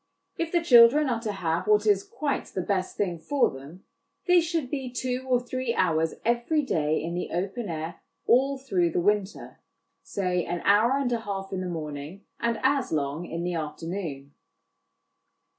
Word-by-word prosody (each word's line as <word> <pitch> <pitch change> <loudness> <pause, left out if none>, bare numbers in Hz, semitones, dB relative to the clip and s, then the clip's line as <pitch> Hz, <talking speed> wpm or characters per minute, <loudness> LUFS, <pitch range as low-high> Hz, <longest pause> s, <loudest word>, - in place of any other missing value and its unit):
If 330 -1 -3
the 345 -1 +2
children 260 +1 +7
are 235 -2 0
to 220 -2 -2
have 170 -2 -2
what 210 0 +4
is 200 -2 +3
quite 295 -2 -3
the 185 - -4
best 185 -1 -2
thing 180 -5 -1
for 280 - +1
them, 140 +8 -11 0.4
they 360 -1 +5
should 325 -5 -2
be 265 -3 -3
two 255 +1 -3
or 250 -1 +4
three 245 -1 -3
hours 160 -3 +1
every 240 +7 +1
day 155 - 0
in 170 +1 -3
the 180 - -3
open 195 +5 -3
air 160 +2 -5 0.2
all 270 +3 +3
through 185 -11 0
the - - +1
winter, 205 +2 -1 0.4
say 180 -3 -1
an 175 +1 -3
hour 225 +6 +4
and 270 -3 -1
a 235 - +1
half 195 -3 -5
in 185 - -2
the 185 - -3
morning 155 +2 -6
and 235 -1 0
as 270 -1 +2
long 150 +2 -2
in 170 +1 -4
the 180 0 -2
afternoon. 155 -2 -5
200 Hz, 175 wpm, -26 LUFS, 170-250 Hz, 0.4 s, children